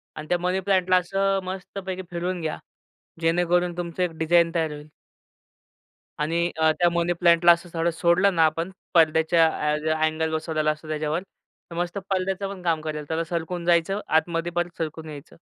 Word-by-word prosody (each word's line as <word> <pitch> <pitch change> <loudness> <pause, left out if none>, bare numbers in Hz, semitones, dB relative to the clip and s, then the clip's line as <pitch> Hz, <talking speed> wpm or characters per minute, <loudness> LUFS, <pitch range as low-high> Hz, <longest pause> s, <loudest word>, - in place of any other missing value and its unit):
आणि 155 - -7
त्या 175 - +2
मनी 180 +2 0
प्लांटला 185 -1 +2
असं 195 +2 +1
मस्तपैकी 190 0 -6
फिरवून 175 +1 -3
घ्या. 155 -1 -3 0.6
जेणेकरून 175 +1 +1
तुमचं 175 0 -3
एक 180 - +1
डिझाइन 170 +1 +3
तयार 160 -2 0
होईल. 150 0 -10 1.3
आणि 170 +3 0
अ, 160 0 +4
त्या 175 - +4
मनी 170 0 +1
प्लांटला 170 0 +6
असं 170 +1 0
थोडं 165 +1 +1
सोडलं 175 +3 +2
ना 165 -1 +5
आपण 165 +4 -1 0.2
पडद्याच्या 160 0 +4 0.3
ऍ 155 +1 -2
अँगल 155 0 0
बसवलेला 155 -1 0
असतो 155 +1 -9
त्याच्यावर 155 +2 -2 0.5
तर - - -7
मस्त 175 +2 -2
पडद्याचं 190 +1 -1
पण 190 - -11
काम 165 -3 +1
करेल 150 -1 -4
त्याला 165 +1 -1
सरकून 170 +1 -4
जायचं, 175 +3 +2
आतमध्ये 165 +1 0
परत 175 0 -2
सरकून 160 0 -5
यायचं. 145 -2 -11
170 Hz, 165 wpm, -24 LUFS, 160-180 Hz, 1.3 s, प्लांटला